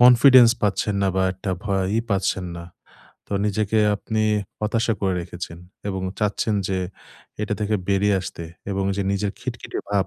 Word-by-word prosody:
Confidence 125 Hz, 0 st, +8 dB
পাচ্ছেন 105 Hz, 0 st, +1 dB
না 95 Hz, -, +3 dB
বা 95 Hz, -, +3 dB
একটা 95 Hz, +1 st, -5 dB
ভয়ই 100 Hz, +1 st, +1 dB
পাচ্ছেন 95 Hz, -1 st, +1 dB
না। 85 Hz, -, -7 dB, 0.6 s
তো -, -, -8 dB
নিজেকে 105 Hz, +1 st, +1 dB, 0.2 s
আপনি 110 Hz, +1 st, -1 dB, 0.4 s
হতাশা 115 Hz, +2 st, +1 dB
করে 95 Hz, -2 st, +1 dB
রেখেছেন 85 Hz, -1 st, -7 dB, 0.3 s
এবং 95 Hz, -1 st, -3 dB, 0.2 s
চাচ্ছেন 105 Hz, +1 st, 0 dB
যে, 95 Hz, -1 st, 0 dB, 0.6 s
এটা 105 Hz, 0 st, -1 dB
থেকে 105 Hz, +1 st, +1 dB
বেরিয়ে 100 Hz, +1 st, +3 dB
আসতে 85 Hz, -2 st, -6 dB, 0.3 s
এবং 95 Hz, 0 st, -1 dB
যে 100 Hz, -, 0 dB
নিজের 100 Hz, 0 st, -1 dB
খিটখিটে -, -, -5 dB
ভাব, 100 Hz, -2 st, +2 dB
100 Hz, 155 wpm, -23 LUFS, 95-110 Hz, 0.6 s, Confidence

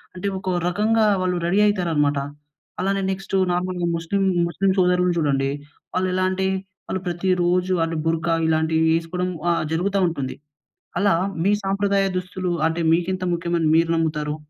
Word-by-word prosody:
అంటే, 180 Hz, +2 st, -3 dB
ఒక 190 Hz, -, -4 dB, 0.2 s
రకంగా 215 Hz, +4 st, +2 dB, 0.2 s
వాళ్ళు 180 Hz, -1 st, 0 dB
రెడీ 190 Hz, +4 st, +2 dB
అయితారనమాట. 160 Hz, -8 st, +1 dB, 0.6 s
అలానే 195 Hz, +1 st, 0 dB
నెక్టు 195 Hz, 0 st, -3 dB, 0.2 s
నార్మల్‌గా 180 Hz, 0 st, -1 dB
ముస్లిం 165 Hz, +4 st, -2 dB, 0.3 s
ముస్లిం 195 Hz, +3 st, 0 dB
సోదరులు 180 Hz, 0 st, +3 dB
జూడండి. 135 Hz, -3 st, +1 dB, 0.5 s
వాళ్ళెలా 185 Hz, 0 st, 0 dB
అంటే, 190 Hz, 0 st, -1 dB, 0.4 s
ఆళ్ళు 190 Hz, -, -2 dB
ప్రతిరోజు 180 Hz, +1 st, +1 dB
ఆళ్ళు 165 Hz, 0 st, -2 dB
బుర్కా 165 Hz, +1 st, +1 dB
ఇలాంటివి 160 Hz, 0 st, +2 dB
వేసుకోవడం 170 Hz, +2 st, -1 dB, 0.2 s
ఆహ్, 170 Hz, -, 0 dB
జరుగుతా 195 Hz, +4 st, 0 dB
ఉంటుంది. 140 Hz, -6 st, -3 dB, 0.6 s
అలా 200 Hz, -4 st, +3 dB, 0.3 s
మీ 200 Hz, -, +4 dB
సాంప్రదాయ 200 Hz, 0 st, +1 dB
దుస్తులు 180 Hz, 0 st, -3 dB, 0.2 s
అంటే, 165 Hz, +1 st, -2 dB
మీకింత 185 Hz, +2 st, 0 dB
ముఖ్యమని 170 Hz, -1 st, -1 dB
మీరు 165 Hz, +1 st, +3 dB
నమ్ముతారు? 150 Hz, -2 st, -1 dB
180 Hz, 135 wpm, -22 LUFS, 165-190 Hz, 0.6 s, మీ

